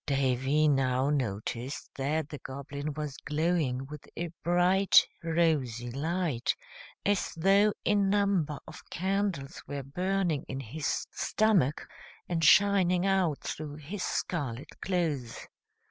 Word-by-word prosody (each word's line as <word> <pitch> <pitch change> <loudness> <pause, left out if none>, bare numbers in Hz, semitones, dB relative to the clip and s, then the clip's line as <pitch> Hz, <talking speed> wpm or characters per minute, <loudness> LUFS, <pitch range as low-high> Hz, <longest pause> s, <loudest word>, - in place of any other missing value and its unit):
Davy 135 +2 +2
now 135 -1 +2
noticed 120 0 -3
that 150 +3 -1
the 145 - -7
Goblin 140 +2 -5
was 150 -2 -4
glowing 150 -4 0
with 150 +1 -10
a 170 0 -2
bright, 180 +3 +5 0.2
rosy 150 -8 +1
light, 155 -2 -1 0.5
as 205 -1 +1
though 195 +5 +4
a - - +3
number 200 -6 +2
of 155 - -12
candles 190 -6 -2
were 140 0 -4
burning 180 +1 -1
in 135 - -4
his 140 +4 -3
stomach 190 -10 +1 0.4
and 165 -2 -1
shining 185 0 +5
out 190 -6 +1
through 150 -2 -5
his 160 +7 -7
scarlet 140 -8 -2
clothes. 155 -10 -2
155 Hz, 115 wpm, -29 LUFS, 135-180 Hz, 0.5 s, bright